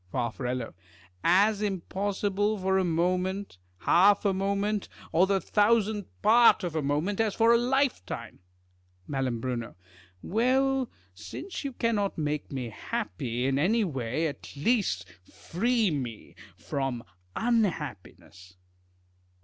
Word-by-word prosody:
Far. 120 0 -1 0.9
As 200 +4 +4
impossible 205 +1 -1
for 190 0 +1
a - - +2
moment, 180 - -1 0.2
half 200 +4 +4
a 200 - +3
moment, 200 +2 -1 0.2
or 180 +4 +4
the 195 0 +2
thousandth 210 0 +2 0.2
part 230 -1 +6
of 170 -3 -3
a 155 - +1
moment, 150 +9 -1
as 215 -3 0
for 230 +1 +5
a - - +6
lifetime. 255 - -1 0.7
3Ial. 125 -4 -3 0.5
Well, 260 +4 +1 0.2
since 355 - -7
you 275 -2 -4
cannot 220 -5 0
make 150 -1 -2
me 130 -4 -4
happy 120 +3 -3
in 135 +1 +1
any 215 +9 +3
way, 135 - -2
at 145 -2 -6
least 205 - 0 0.2
free 225 +2 0
me 125 -7 -5 0.2
from 120 +7 -3 0.3
unhappiness. 150 - -2
190 Hz, 115 wpm, -28 LUFS, 140-215 Hz, 0.9 s, part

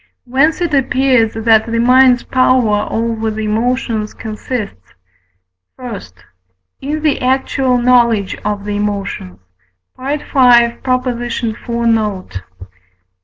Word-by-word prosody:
Whence 280 +7 +1
it 340 -3 -1
appears 260 -4 +2
that 225 0 +3
the 230 - 0
mind's 250 +1 +4
power 255 -5 +2
over 225 -1 -2
the 220 0 -4
emotions 225 0 -1
consists: 215 - -6 0.8
I. 245 -5 -6 0.8
In 300 +3 -4
the 305 -2 +1
actual 260 0 +1
knowledge 235 -5 +2
of 205 -1 -3
the 205 0 -3
emotions 200 - -4 0.6
(V. 270 +3 -2
iv. 245 -3 +1 0.2
note). 210 - -1
235 Hz, 100 wpm, -15 LUFS, 215-255 Hz, 0.8 s, mind's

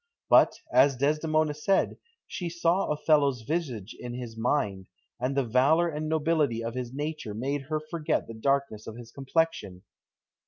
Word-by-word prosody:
But, - - +6 0.2
as 140 -1 +5
Desdemona 155 +2 +1
said, 170 +6 0 0.3
she 175 -2 -5
saw 170 +3 +1
Othello's 145 -5 +2
visage 125 - -3
in 120 0 -6
his 120 -3 -7
mind, 105 -6 -1 0.3
and 130 +3 -1
the 140 - +3
valour 140 +9 +3
and 155 0 -4
nobility 155 -7 +1
of 115 0 -3
his 125 -1 -4
nature 145 -6 -4
made 135 +5 -2
her 155 -1 0
forget 155 0 -2
the 115 - -9
darkness 135 -2 -1
of 110 - -7
his 120 -1 -11
complexion. 135 - -1
140 Hz, 155 wpm, -28 LUFS, 120-155 Hz, 0.3 s, But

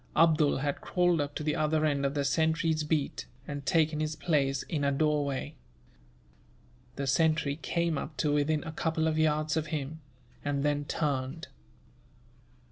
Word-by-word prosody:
Abdool 155 -2 +4
had 145 +1 -2
crawled 175 -3 +2
up 145 0 -4
to - - -3
the 150 0 0
other 155 0 +1
end 140 -2 +1
of 140 - -4
the 140 -1 0
sentry's 160 +1 +1
beat, 150 -2 -1 0.2
and 145 -2 -6
taken 155 0 +2
his 155 0 -1
place 140 -4 +1
in 150 -4 -3
a 140 - +2
doorway. 145 -1 0 1.4
The 140 - -3
sentry 145 +1 +2
came 170 -1 -1
up 155 - -7
to 145 +2 +1
within 150 +1 +1
a 160 - -5
couple 160 0 0
of 155 0 0
yards 155 0 +2
of 155 -1 -1
him, 155 0 -4 0.4
and 145 -1 -1
then 145 0 0
turned. 145 0 -2
150 Hz, 160 wpm, -30 LUFS, 145-160 Hz, 1.4 s, Abdool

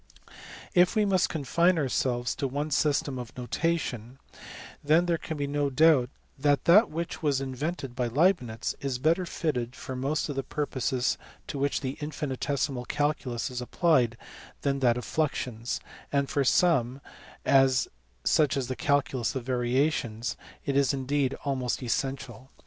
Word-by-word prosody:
If 180 +2 +4
we 215 -1 +3
must 190 -2 +2
confine 170 +4 +2
ourselves 125 -4 0
to 140 - -1
one 145 +4 -3
system 140 -2 +1
of 120 0 -9
notation 125 -3 -2 0.7
then 155 +4 +4
there 170 -2 0
can 160 +1 -5
be 145 - -1
no 145 0 0
doubt 140 -2 +4 0.3
that 145 0 +2
that 205 +6 +7
which 165 +2 -4
was 145 -4 +1
invented 135 0 -4
by 125 -1 0
Leibnitz 125 -4 +1
is 135 -3 -2
better 165 +7 +1
fitted 125 -8 -2
for 130 - -6
most 140 +4 -1
of 145 - -4
the 135 - 0
purposes 130 -4 -1 0.3
to 140 - -5
which 140 +1 0
the 135 -1 -4
" - - -15
infinitesimal 140 -3 -2
calculus 145 -4 -1
is 125 0 -4
applied 125 -4 +2 0.5
than 140 -1 +1
that 120 -3 +3
of 125 - -5
fluxions, 125 -6 -2 0.3
and 140 -1 0
for 140 - +2
some 135 -4 +3 1.2
(such 150 -3 +3
as 130 -3 -1
the 130 - -3
calculus 135 -1 0
of 130 - -3
variations) 125 -2 0 0.3
it 140 - -1
is 140 0 +3
indeed 135 0 0
almost 130 -2 -1
essential. 130 +1 -3
140 Hz, 150 wpm, -28 LUFS, 125-155 Hz, 1.2 s, that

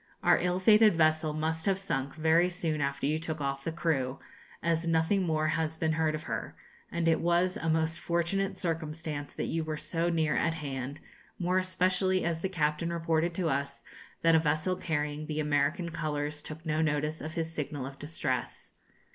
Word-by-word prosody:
Our - - +5
ill 180 +1 0
fated 210 +1 +6
vessel 155 -1 +3
must 160 +2 -2
have 195 -1 +3
sunk 140 -8 -3
very 160 +3 +4
soon 165 -4 -2
after 140 -1 -1
you 155 +2 +1
took 160 -1 -4
off 140 -1 -2
the 165 - -2
crew, 140 -6 0 0.5
as 170 0 +1
nothing 165 +4 +2
more 155 -3 +1
has 160 0 -1
been 160 0 +1
heard 155 -1 +1
of 155 - -6
her, - - -4 0.4
and 170 -1 0
it 160 -1 +4
was 175 +2 +2
a 165 - -2
most 160 +1 +1
fortunate 190 +3 0
circumstance 160 -3 -3
that - - -2
you 165 0 -1
were 155 -1 -3
so 165 +3 -1
near 160 -3 +1
at 165 -1 +1
hand, 140 -2 -5 0.4
more 180 +1 +2
especially 185 0 +1
as 170 -1 0
the 190 - -2
captain 155 -1 0
reported 165 0 0
to 180 -2 0
us, 140 +1 -2 0.4
that 165 0 +5
a 160 - +6
vessel 155 +4 +1
carrying 150 -3 -2
the 155 0 -2
American 150 +3 +1
colours 150 -2 -2
took 155 +2 -9
no 155 0 +1
notice 150 0 0
of 155 +1 -6
his 165 -1 -2
signal 145 -3 -3
of 135 0 -9
distress. 145 -4 -3
160 Hz, 190 wpm, -30 LUFS, 150-170 Hz, 0.5 s, fated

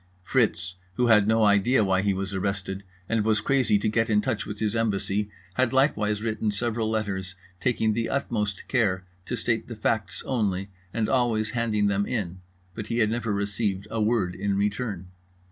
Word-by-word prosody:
Fritz, 95 -6 +1 0.2
who 125 - +2
had 105 -3 +5
no 110 0 +4
idea 105 +4 +4
why 95 -1 +2
he 100 0 +2
was 95 +1 -3
arrested 95 0 -2 0.3
and 115 -2 +1
was 110 0 +2
crazy 125 -2 +2
to 100 - -1
get 115 +1 +1
in 105 -1 +4
touch 105 0 -1
with 105 0 -5
his 110 0 -1
embassy, 105 -2 0 0.2
had 130 +4 +1
likewise 105 -6 +2
written 110 -1 -1
several 110 +1 0
letters, 95 -4 -2 0.2
taking 110 -2 +1
the 115 +1 -1
utmost 105 -8 -2
care 100 -7 +1 0.2
to - - -1
state - - -1
the - - -6
facts - - -1
only 100 -6 -1 0.2
and 110 0 0
always 115 -4 +1
handing 115 -3 +1
them 100 0 +1
in; 95 -7 -3 0.3
but 110 0 -6
he 115 - -2
had 110 -2 +3
never 115 -1 -1
received 100 0 -1
a 115 - -1
word 105 -5 +1
in 100 +1 -1
return. 100 -3 -2
105 Hz, 180 wpm, -26 LUFS, 100-115 Hz, 0.3 s, had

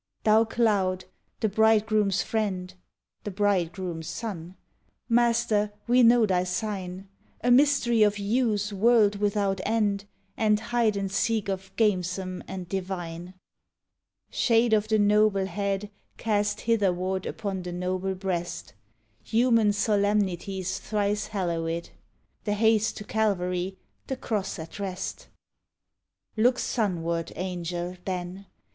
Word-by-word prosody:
Thou 220 +1 +5
Cloud, 200 -5 +1 0.4
the 220 - +3
bridegroom's 215 -2 +3
friend 190 -5 -2 0.5
(The - - -4
bridegroom 185 -3 -1
sun)! 180 -1 -6 0.5
Master, 230 -3 +2
we 245 +1 +4
know 235 -1 +6
thy 185 -3 +1
sign: 185 0 -4 0.3
A 245 - +2
mystery 250 -3 +4
of 210 -1 +4
hues 210 0 0
world 210 0 +4
without 200 -2 0
end; 205 -2 0 0.3
And 215 -1 +2
hide 230 -2 +1
and 195 -1 -2
seek 220 0 0
of 190 0 -4
gamesome 185 -3 0
and 185 -2 -6
divine; 180 -2 -5 1.0
Shade 230 -1 +3
of 215 0 +2
the 220 0 +2
noble 205 -1 +3
head 200 +2 -2 0.3
Cast 210 -1 0
hitherward 190 -4 0
upon 195 -3 -4
the 180 0 -6
noble 185 +2 -2
breast; 185 -2 -4 0.5
Human 230 -2 +3
solemnities 200 -3 0
thrice 210 0 -1
hallowèd; 170 -4 -2 0.5
The 205 - 0
haste 220 0 +2
to 210 - -6
Calvary, 190 -4 -1 0.3
the 265 - -3
Cross 210 -5 -3
at 165 +4 -9
rest. 190 -2 -5 1.1
Look 245 +3 +3
sunward, 170 -9 -1
Angel, 175 0 -4
then! 185 +1 -5
200 Hz, 115 wpm, -27 LUFS, 185-220 Hz, 1.1 s, know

